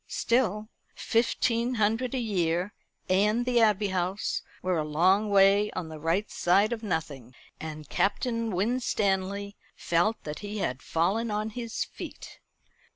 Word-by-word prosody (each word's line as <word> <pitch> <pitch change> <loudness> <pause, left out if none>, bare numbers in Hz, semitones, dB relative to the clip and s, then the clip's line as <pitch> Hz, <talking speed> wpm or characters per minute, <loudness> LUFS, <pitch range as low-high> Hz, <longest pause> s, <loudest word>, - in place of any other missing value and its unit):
Still, 220 -3 0 0.3
fifteen 235 +1 +1
hundred 225 +4 +1
a - - 0
year 185 -4 0 0.3
and 210 +5 +2
the 245 -1 +2
Abbey 210 -2 +3
House 185 +2 -1 0.2
were 180 -2 +1
a - - 0
long 185 +8 +2
way 200 +1 +5
on 170 -3 -4
the 155 -1 -8
right 170 +7 0
side 200 +6 +3
of 225 - -5
nothing: 145 - -4 0.2
and 155 -2 -7
Captain 230 - 0
Winstanley 200 -2 -1 0.2
felt 175 +7 0
that 150 0 -6
he 210 0 -6
had 130 -10 -2
fallen 195 +8 0
on 210 +1 -2
his 235 0 -3
feet. - - -10
200 Hz, 140 wpm, -28 LUFS, 175-225 Hz, 0.3 s, way